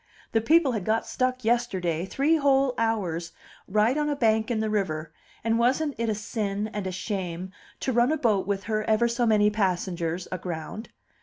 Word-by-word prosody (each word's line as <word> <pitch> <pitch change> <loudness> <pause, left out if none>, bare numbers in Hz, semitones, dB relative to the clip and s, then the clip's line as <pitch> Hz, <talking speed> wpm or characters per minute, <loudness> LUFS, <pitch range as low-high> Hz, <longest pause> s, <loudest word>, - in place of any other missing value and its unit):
The 225 - +2
people 310 +3 +4
had 215 -5 -2
got 220 +4 0
stuck 255 -2 -1
yesterday, 190 -8 0
three 295 +9 +2
whole 275 -3 +3
hours, 185 -7 -1 0.3
right 215 +5 +2
on 295 0 0
a 290 - 0
bank 220 -3 +2
in 235 -2 0
the 220 - 0
river; 165 -7 -2 0.3
and 225 +1 +1
wasn't 270 +5 +2
it 230 -1 0
a 215 - 0
sin 210 -1 -3
and 205 -2 -3
a - - -2
shame 185 -2 -4 0.3
to 260 - 0
run 240 +4 +3
a 315 - +1
boat 215 -9 +1
with 195 -1 -2
ever 215 +1 +2
so 235 0 0
many 210 -1 +4
passengers 180 -4 -1
aground? 180 +4 -5
220 Hz, 180 wpm, -26 LUFS, 190-240 Hz, 0.3 s, people